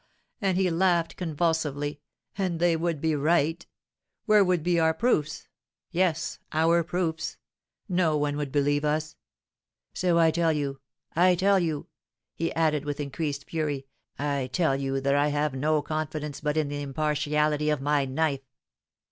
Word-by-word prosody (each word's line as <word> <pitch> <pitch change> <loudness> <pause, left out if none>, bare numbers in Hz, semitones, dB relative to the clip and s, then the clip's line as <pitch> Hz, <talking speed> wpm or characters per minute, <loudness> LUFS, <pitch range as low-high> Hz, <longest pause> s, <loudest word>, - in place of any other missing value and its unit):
and 190 -3 +1
he 185 -2 +2
laughed 170 -1 +2
convulsively, 150 -3 -1 0.4
"and 185 -4 -1
they 175 -1 +3
would 165 -1 -1
be 160 +1 +1
right. 160 +2 +1 0.6
Where 210 -1 +6
would 180 -4 +1
be 175 0 +2
our 160 0 +3
proofs? 205 -10 0 0.4
yes, 170 -2 0
our 165 +2 +3
proofs? 165 -1 -2 0.5
No 175 -5 +2
one 145 -1 0
would 145 -2 -3
believe 145 +1 +1
us. 155 +1 -1 0.8
So, 175 -2 +1
I 165 -1 +5
tell 165 0 +2
you 140 -2 -3 0.4
I 180 +2 +5
tell 195 +2 +3
you," 160 -4 -2 0.5
he 165 - -2
added, 155 -3 +1
with 145 0 -4
increased 145 0 -3
fury, 150 -4 -2 0.3
"I 140 -2 -1
tell 160 -5 +2
you 135 0 -1
that 140 +1 +1
I 145 +1 +3
have 145 -1 0
no 150 +3 +1
confidence 155 -2 -4
but 150 0 -1
in 155 -2 +1
the 145 0 -4
impartiality 150 +1 0
of 150 -2 +1
my 145 0 +1
knife." 140 +1 0
155 Hz, 155 wpm, -27 LUFS, 145-170 Hz, 0.8 s, Where